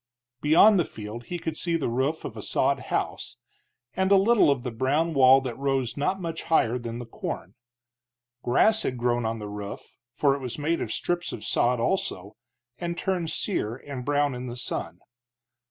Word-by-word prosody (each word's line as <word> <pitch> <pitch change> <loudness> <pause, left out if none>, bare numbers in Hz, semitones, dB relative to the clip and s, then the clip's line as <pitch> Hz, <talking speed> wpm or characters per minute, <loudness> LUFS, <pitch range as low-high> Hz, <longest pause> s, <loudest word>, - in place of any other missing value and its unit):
Beyond 180 +7 +6
the 170 - +2
field 110 +2 -8
he 175 - -4
could 160 -2 -4
see 170 +1 -1
the 165 - 0
roof 130 +7 -1
of 115 - -6
a 110 - -6
sod - - +1
house, - - -2 0.6
and 190 +1 +1
a - - +8
little 205 -1 +5
of 135 -4 +1
the 125 - -3
brown 145 +8 0
wall 135 -1 +7
that 125 -3 -4
rose 135 -3 0
not 165 +7 0
much 165 -3 -4
higher 125 -7 +2
than 115 -1 -5
the 120 - -6
corn. 95 -5 -6 0.9
Grass 215 - +3
had 125 - -2
grown 120 -1 0
on 115 +1 -2
the 105 -1 -6
roof, 105 -1 -8
for 135 +4 +2
it 140 - -3
was 125 -3 -4
made 155 +3 0
of - - -3
strips 175 0 -2
of 105 - -7
sod, 125 0 +1
also, 105 - -1 0.4
and 170 0 -3
turned 180 -4 -1
sere 120 - -1
and 135 -1 -7
brown 145 0 +1
in 125 0 -6
the 120 - -6
sun. - - -5
135 Hz, 190 wpm, -26 LUFS, 120-165 Hz, 0.9 s, a